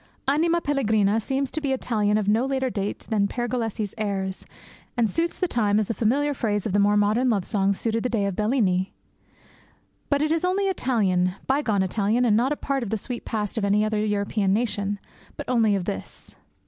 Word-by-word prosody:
Anima 330 +5 +2
pellegrina 220 -8 +2
seems 270 +4 -2
to 315 - -2
be 275 -2 0
Italian 215 -5 +1
of 210 -2 -1
no 220 +4 +3
later 265 -1 -1
date 200 -2 -3
than 205 -2 +2
Pergolese's 230 -3 -3
airs, 195 -3 -2 0.5
and 235 -2 +3
suits 335 +9 -1
the 365 - 0
time 210 -8 +1
as 215 -2 +1
the - - -1
familiar 270 +8 +1
phrase 210 -6 -1
of 210 - -2
the 205 - +3
more 205 +1 +4
modern 215 +5 +2
love 200 -5 +1
song 200 -3 +1
suited 225 +3 -1
the 250 - -1
day 220 -4 0
of 200 -2 -2
Bellini. 205 -4 +1 1.2
But 285 0 +2
it 310 - 0
is 330 +1 +1
only 375 +2 +1
Italian, 195 - +1
bygone 250 -8 +1
Italian, 210 +5 +1
and 215 -3 +4
not 245 +5 +2
a - - +1
part 275 -2 -2
of 235 - -4
the 220 - 0
sweet 240 +3 -6
past 215 0 -2
of - - -3
any 205 +1 +3
other 215 -1 0
European 205 -1 0
nation, 205 -2 -1 0.4
but - - -6
only 225 -4 +3
of 190 -3 -2
this. 95 - -7
220 Hz, 200 wpm, -24 LUFS, 205-260 Hz, 1.2 s, more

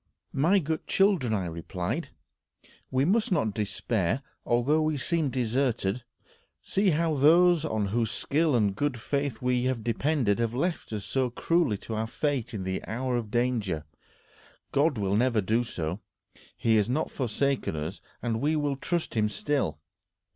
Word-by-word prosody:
"My 165 +9 +4
good 160 -3 -2
children," 190 - +3
I 100 -4 0
replied, 85 +2 -4 0.8
"we 130 +1 +2
must 215 +6 +2
not 130 - +1
despair, 105 +2 -1 0.2
although 130 +7 +3
we 155 -1 +1
seem 160 +2 0
deserted. 125 -3 0 0.6
See 195 0 +1
how 165 0 +2
those 165 +3 +5
on 110 -9 -1
whose 115 +1 0
skill 150 +5 +1
and 105 -4 +2
good 140 +1 -1
faith 140 0 -2
we 125 0 +2
depended 115 0 0
have 115 0 0
left 170 +2 -2
us 105 +2 -5 0.2
cruelly 165 -11 +2
to 115 - -4
our 110 +1 -1
fate 140 0 -1
in 105 -4 -4
the 95 0 -3
hour 125 +2 -1
of 115 -3 -2
danger. 110 - 0 0.9
God 145 -1 +2
will 100 -1 0
never 120 0 +3
do 110 +4 +1
so. 85 -5 -4 0.6
He 110 -1 +3
has 105 +1 +2
not 150 +6 0
forsaken 135 - -1
us, 80 +5 -5 0.2
and 115 -2 -1
we 155 +2 +2
will 145 -2 0
trust 170 +4 -2
him 105 -2 +2
still. 135 - -1
125 Hz, 155 wpm, -28 LUFS, 110-150 Hz, 0.9 s, those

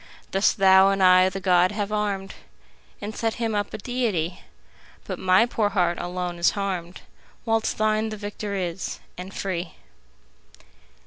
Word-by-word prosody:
Thus 195 +2 +3
thou 190 0 +6
and 195 -1 +1
I 185 0 +6
the 190 +1 -5
god 180 0 +3
have 205 -1 -3
arm'd 200 -2 -2 0.7
And 210 +1 -5
set 225 -1 -1
him 230 -2 -2
up 205 -1 -1
a - - -5
deity; 200 -8 -2 0.6
But - - -5
my 185 +4 +4
poor 220 -3 0
heart 175 -3 +1
alone 180 -1 -4
is 170 - +3
harm'd, 185 -3 -3
15 - - -25 0.4
Whilst 225 -1 0
thine 215 0 +1
the 215 - -6
victor 205 0 -5
is, 180 -1 -4 0.2
and 180 +2 -8
free! 175 -4 -4
195 Hz, 155 wpm, -24 LUFS, 185-210 Hz, 0.7 s, thou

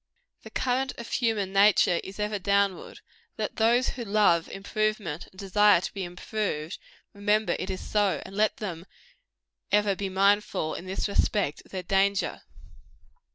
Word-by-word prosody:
The - - -11
current 260 +1 -1
of 235 - -7
human 215 -6 0
nature 195 -3 +4
is 195 +2 -9
ever 210 0 -1
downward: 200 0 0 0.4
let - - -3
those 235 +3 +3
who 245 - -5
love 200 -6 +3
improvement 205 -4 -2
and 185 - -22
desire 205 0 +4
to 180 - -5
be 195 - -4
improved, 180 -2 -4 0.3
remember 210 +1 +1
it - - -4
is 190 - -4
so; 205 -2 +1
and 195 - -10
let 215 +1 +2
them 180 -4 -6 0.8
ever 205 -1 +3
be 195 0 -3
mindful, 195 -4 +1
in 185 - -7
this 190 +3 -2
respect, 200 -5 0
of - - -21
their 185 -1 -4
danger. 195 +2 +1
200 Hz, 155 wpm, -27 LUFS, 190-215 Hz, 0.8 s, nature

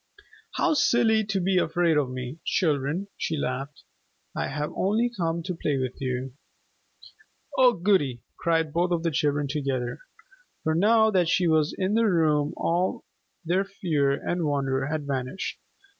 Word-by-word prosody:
"How 350 - +2
silly 225 -6 +3
to 195 -1 -1
be 185 0 +2
afraid 170 0 +2
of 145 -4 +1
me, 130 +4 -6
children," 155 +3 0
she 160 - -2
laughed. 135 +1 -4 0.5
"I - - -1
have 150 0 -3
only 225 +5 +1
come 170 -3 -1
to 180 - -3
play 150 -4 -1
with 130 0 -4
you." 130 0 -3 1.2
"Oh 255 -2 +6
goody!" 170 - +1
cried 165 -2 0
both 175 +1 +1
of 170 -2 0
the 165 - +1
children 145 0 0
together. 135 -4 -2 0.6
For 160 - +1
now 220 +5 +4
that 180 -4 +2
she 180 +1 +2
was 155 -1 +2
in 190 +1 0
the 225 0 +3
room 155 -5 +2
all 175 +2 0 0.4
their 180 +4 +2
fear 170 -8 0
and 175 +4 -2
wonder 135 -2 0
had 150 -1 -3
vanished. 135 +4 -3
160 Hz, 155 wpm, -26 LUFS, 140-185 Hz, 1.2 s, Oh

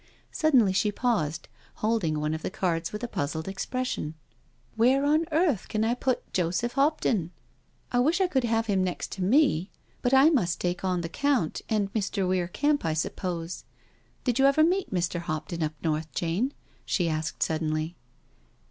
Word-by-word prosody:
Suddenly 255 -11 +3
she 210 +2 +2
paused, 170 -10 -1 0.3
holding 210 -9 0
one 150 +1 -1
of 160 - -4
the - - -3
cards 170 -3 -1
with 210 +3 -6
a - - -1
puzzled 160 -3 -3
expression. 195 -4 -3 0.3
" - - -36
Where 255 +5 +3
on 310 +3 +3
earth 310 - +2
can 215 -1 -1
I 225 +2 +2
put 255 +1 -2
Joseph 180 +6 0
Hopton?... 275 - +1 0.6
I 245 - +2
wish 315 +8 +3
I 380 - +4
could 270 -8 +1
have 225 -1 +1
him 195 -4 +1
next 180 -1 -3
to 190 - -3
me, 205 - +3 0.3
but 245 - +1
I 270 +4 +7
must 180 - +1
take 175 +1 -2
on 180 -2 0
the 165 - -3 0.2
Count 255 - +1
and 205 -2 0
Mr. 200 -3 -1
Weir 180 -1 +1
Kemp, 290 +10 +1
I 160 -1 0
suppose. 170 +1 -3 0.6
Did 250 -1 0
you 270 - +6
ever 280 +3 +4
meet 365 +4 +1
Mr. 175 -2 -1
Hopton 165 0 -4
up 155 0 -1
north, 155 0 -1
Jane?" 180 +11 0 0.3
she 175 -3 0
asked 155 -1 -1
suddenly. 155 +1 -1
195 Hz, 175 wpm, -27 LUFS, 165-255 Hz, 0.6 s, I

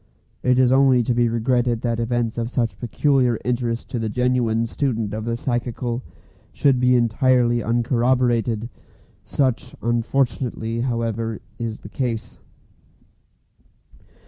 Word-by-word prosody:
It 125 0 +2
is 130 -1 +4
only 130 -2 +5
to 120 - 0
be 120 0 +2
regretted 120 0 +1
that 115 -2 -1
events 115 0 -1
of 115 0 -2
such 120 -3 -1
peculiar 125 -1 +2
interest 120 -1 -1
to 120 - -2
the 110 -1 -2
genuine 120 -1 +1
student 115 -4 -2
of 110 0 -4
the 115 0 -1
psychical 120 0 -2 0.5
should 135 -3 +2
be 125 0 +4
entirely 120 0 +3
uncorroborated. 120 0 +1 0.6
Such 130 -4 -1
unfortunately, 120 -1 -1
however, 115 -2 -2 0.2
is 115 -2 -4
the 105 - -10
case. 115 -2 -4
120 Hz, 120 wpm, -22 LUFS, 115-125 Hz, 0.6 s, only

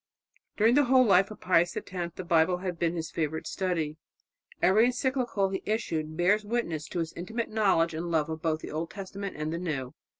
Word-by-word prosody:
'" - - -40
During 225 +2 +5
the 285 +1 +5
whole 255 0 +5
life 195 -2 +4
of 215 - -11
Pius 175 -1 +2
X - - -6 0.2
the 185 - -5
Bible 170 0 +3
had 180 -2 -4
been 170 0 0
his 160 -2 -4
favourite 160 0 -2
study. 165 -5 -2 0.6
Every 215 +5 +5
encyclical 250 -5 0
he 190 0 -3
issued 160 -8 -2
bears 200 +5 +3
witness 205 -9 -2
to - - -6
his 165 -1 -2
intimate 220 +7 -4
knowledge 195 -7 +2
and 165 +2 -4
love 160 -3 +1
of 160 0 -5
both 160 -2 0
the - - -7
Old 160 +2 -3
Testament 195 0 -6
and 155 +1 -3
the 170 - -2
New. 140 -8 -3
180 Hz, 205 wpm, -28 LUFS, 160-210 Hz, 0.6 s, During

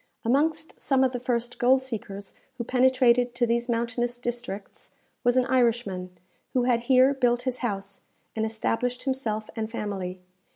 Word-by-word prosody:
Amongst 310 +6 0
some 265 -1 +3
of 260 - +3
the 250 - -3
first 240 -1 -2
gold 260 +2 +4
seekers 205 -5 -6 0.2
who 240 - -2
penetrated 250 -1 +3
to 240 0 +2
these 235 +1 0
mountainous 235 +1 -1
districts, 240 -4 -5 0.3
was 245 0 +3
an 255 - +4
Irishman, 230 -8 +1 0.4
who 250 - +2
had 245 -1 +3
here 260 +1 +6
built 245 -2 +1
his 255 -1 -2
house, 200 -4 -4 0.3
and 220 - 0
established 230 +3 -1
himself 230 -6 -2
and 220 -1 -3
family. 195 -5 -4
240 Hz, 155 wpm, -26 LUFS, 225-255 Hz, 0.4 s, here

